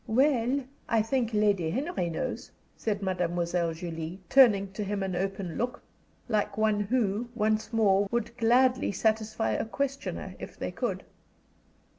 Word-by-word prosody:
"Well, 260 +2 +2 0.3
I 225 -2 +3
think 240 0 0
Lady 205 -6 +2
Henry 265 - -1
knows," 165 - -4 0.3
said 205 -2 -2
Mademoiselle 175 -2 0
Julie, 165 +1 -5
turning 205 -8 +6
to 210 - -3
him 200 0 -2
an 190 -2 -2
open 190 -2 -3
look, 245 +1 -2 0.4
like 215 -3 0
one 215 -1 +2
who, 215 +1 0
once 215 0 0
more, 200 -3 +3
would 235 0 -2
gladly 250 +2 +3
satisfy 220 +2 0
a - - 0
questioner 275 +4 -3
if - - -9
they - - -3
could. - - -3
215 Hz, 140 wpm, -28 LUFS, 190-235 Hz, 0.4 s, turning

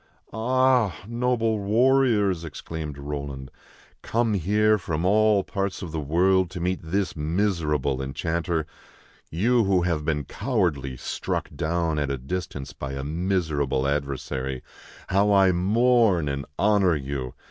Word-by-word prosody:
" - - -28
Ah! 125 - +2
noble 115 -2 0
warriors," 110 -4 +3
exclaimed 80 -2 -6
Roland, 70 -2 -6 0.3
" - - -25 0.2
come 115 -1 0
here 105 +3 +2
from 80 -1 -2
all 105 0 +4
parts 100 0 -3
of 85 - -6
the 80 - -3
world 90 +5 +2
to 90 0 -7
meet 90 +2 -1
this 95 +4 -2
miserable 75 -5 0
enchanter, 80 +4 -2 0.6
you 115 +8 +2
who 95 -2 +2
have 85 -4 0
been 75 -2 -1
cowardly 85 - -1
struck - - -3
down 80 -1 -1
at 70 -2 -1
a 70 - -1
distance 70 0 -5
by 70 0 -6
a 70 0 -4
miser 80 0 -1
able 65 -1 0
adversary, 70 -2 -3 0.5
how 100 +2 +3
I 95 -2 +5
mourn 105 -1 +3
and 70 0 -4
honor 100 -4 +3
you! 65 -3 -4
85 Hz, 140 wpm, -25 LUFS, 75-105 Hz, 0.6 s, I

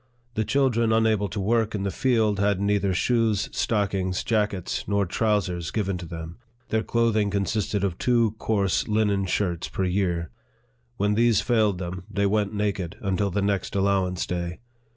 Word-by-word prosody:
The 110 - 0
children 120 -3 +2
unable 110 -2 +2
to 105 - -4
work 110 +2 +1
in 100 - -2
the 100 - -1
field 110 -5 +1
had 100 -1 +2
neither 100 -1 +1
shoes, 110 +1 +1
stockings, 95 -4 0
jackets, 105 -5 -1
nor 100 -1 +1
trousers, 95 -4 0
given 100 -4 -2
to 85 - -7
them; 80 +3 -8 0.3
their 110 - +1
clothing 115 -3 +1
consisted 100 0 -1
of 95 -3 -1
two 120 -3 +3
coarse 100 -4 0
linen 105 -3 +1
shirts 90 -3 -1
per 95 - -2
year. 90 -3 0 0.7
When 105 +1 +1
these 115 -1 +3
failed 110 -6 +2
them, 90 0 -6
they 100 -1 0
went 105 0 +1
naked 100 -5 -2
until 100 0 0
the 100 +2 -1
next 100 -1 -1
allowance 95 -2 +1
day. 85 0 -3
100 Hz, 160 wpm, -25 LUFS, 95-110 Hz, 0.7 s, two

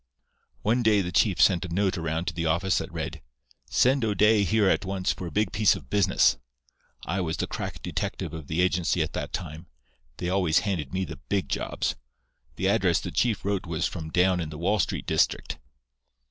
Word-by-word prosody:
"One 115 +4 +2
day 110 -3 +4
the 90 -1 -4
chief 95 -3 +2
sent 85 +1 +4
a 90 - -6
note 95 +2 +1
around 80 0 -2
to 90 - -2
the 85 0 -2
office 90 +4 +1
that - - -6
read: 80 -2 -5 0.5
'Send 130 0 +3
O'Day 105 0 +4
here 105 0 +2
at 95 - +2
once 95 -1 -1
for 90 - -7
a - - -7
big 105 +2 0
piece 105 0 +3
of 65 -3 -11
business.' 95 -9 +3 0.7
I 95 +4 -1
was 80 -2 -2
the - - -1
crack - - -6
detective 80 - -3
of 80 -3 -7
the 80 +3 0
agency 90 -1 +1
at - - -6
that - - -4
time. 85 -1 -6 0.5
They 90 - -3
always 90 -3 +2
handed 85 -9 -2
me 95 0 -1
the - - -8
big 95 -9 0
jobs. - - -1 0.6
The - - -1
address - - +3
the - - -6
chief 115 -6 0
wrote 100 -2 0
from - - -11
was 85 0 0 0.2
down 90 +2 +3
in 80 -3 -3
the 75 - -8
Wall 100 +6 +1
Street 85 - -1
district. - - 0
90 Hz, 200 wpm, -26 LUFS, 80-100 Hz, 0.7 s, day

